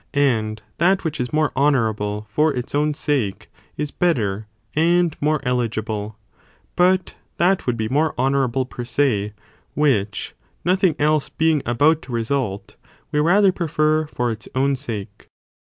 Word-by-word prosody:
And 110 -6 +1 0.2
that 185 +4 +3
which 160 -4 -3
is 125 0 -2
more 155 -1 +1
honourable 110 -7 +1
for 150 +7 +3
its 125 -2 -5
own 150 +1 +1
sake 140 -10 -2 0.3
is 150 0 -3
better 110 - 0 0.3
and 170 +1 +3
more 155 +1 +2
eligible, 110 -4 -2 0.6
but 185 +1 +2 0.2
that 180 -1 +2
would 120 -2 +1
be 110 -1 -1
more 150 +6 +1
honourable 130 -1 +1
per 125 -1 -7
se, 115 -5 0 0.4
which, 110 -9 0 0.3
no 180 +1 +4
thing 185 -5 +2
else 150 0 +1
being 160 -2 +1
about 150 +7 +3
to 130 - -11
result, 115 -3 -2 0.3
we 150 - +1
rather 190 +6 +4
prefer 155 -3 0
for 120 -4 -2
its 110 -1 -7
own 135 +1 +2
sake. 110 -6 -7
140 Hz, 145 wpm, -21 LUFS, 115-155 Hz, 0.6 s, no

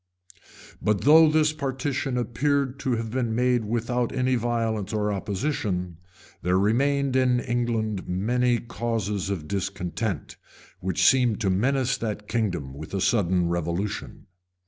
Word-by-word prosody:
] - - -20
But 105 -2 +1
though 155 +2 +7
this 155 0 +3
partition 135 -2 -2
appeared 135 +3 0
to 130 - -1
have 115 -1 -4
been 120 -3 -1
made 125 -1 +2
without 120 +2 -1
any 130 0 +1
violence 115 -4 -1
or 105 -1 0
opposition, 95 - -2 0.4
there 90 +1 +2
remained 135 +6 +2
in 125 -1 +3
England 115 -5 -1
many 120 +6 +1
causes 110 -5 -3
of 85 -7 -3
discontent, 95 0 -3 0.4
which 95 -1 0
seemed 125 -5 +4
to 95 -3 +2
menace 130 +6 +1
that 105 -2 -4
kingdom 95 - -2
with 80 +7 -7
a - - 0
sudden 90 -4 +2
revolution. 85 +4 -3
115 Hz, 135 wpm, -25 LUFS, 100-125 Hz, 0.4 s, though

